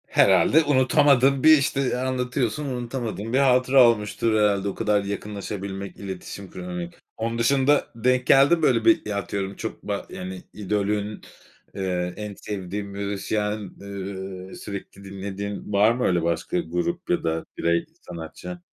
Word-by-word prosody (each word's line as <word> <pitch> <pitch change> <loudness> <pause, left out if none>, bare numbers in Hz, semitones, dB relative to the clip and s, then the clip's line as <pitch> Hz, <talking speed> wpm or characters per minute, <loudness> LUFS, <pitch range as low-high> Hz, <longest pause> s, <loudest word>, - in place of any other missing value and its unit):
Herhâlde 160 +2 +5
unutamadığın 140 -1 +4
bir, 155 0 +8
işte, 135 -2 0
anlatıyorsun 125 0 -1
unutamadığın 120 -4 -4
bir - - +4
hatıra 130 -1 +5
olmuştur 110 0 0
herhâlde, 100 -1 +2
o - - -6
kadar 105 -2 +1
yakınlaşabilmek, 100 -1 -5
iletişim 95 0 -7
kurabilmek. 90 -1 -6 0.2
Onun 115 +1 -2
dışında 140 +4 +3
denk 125 +2 +1
geldin 140 +5 +6
mi, 165 - -6
böyle, 120 -5 +3
bir, 170 -1 +4
ya, 105 -1 -2
atıyorum 100 0 -3
çok - - -6
ba - - -3
yani, 95 0 -7
idolün, 105 +1 -2 0.5
ııı, 90 -2 -2
en 105 -1 -5
sevdiğin 100 0 -5
müzisyen, 100 +1 -3
ııı, 95 -1 -7
sürekli 100 -1 -8
dinlediğin. 100 +1 -6
Var 105 +3 +5
mı 125 +1 -1
öyle 90 -2 +2
başka 85 -1 -1
grup 90 - -3
ya 175 -2 +1
da 80 0 -1
birey, 85 0 +1 0.2
sanatçı? 90 - -8
105 Hz, 140 wpm, -24 LUFS, 95-125 Hz, 0.5 s, bir